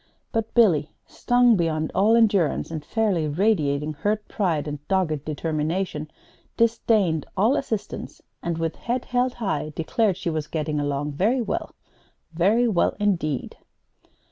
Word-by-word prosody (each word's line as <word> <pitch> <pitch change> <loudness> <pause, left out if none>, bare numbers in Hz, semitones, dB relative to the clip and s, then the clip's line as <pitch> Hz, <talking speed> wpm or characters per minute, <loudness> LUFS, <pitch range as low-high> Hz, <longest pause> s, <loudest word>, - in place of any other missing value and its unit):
But 225 -1 -2
Billy, 170 - +4 0.2
stung 245 -1 +3
beyond 160 -3 0
all 215 +4 +4
endurance, 200 -10 +2
and 155 -2 -4
fairly 200 -8 0
radiating 150 -4 +1
hurt 210 +7 -2
pride 165 -8 -1
and 150 -1 -4
dogged 170 -7 0
determination, 155 +1 -2 0.5
disdained 220 -8 +2
all 220 +8 +3
assistance, 220 -7 -4 0.2
and, 170 -1 -2
with 165 -1 -2
head 245 +1 -2
held 250 0 0
high, 175 -9 -2
declared 190 +4 0
she 185 -3 -2
was 155 -1 -3
getting 155 -1 -2
along 145 0 -2
very 210 - +1
well, 235 - -3 0.6
very 205 +9 +3
well 200 -7 +1
indeed! 170 -9 -1
175 Hz, 135 wpm, -24 LUFS, 155-220 Hz, 0.6 s, Billy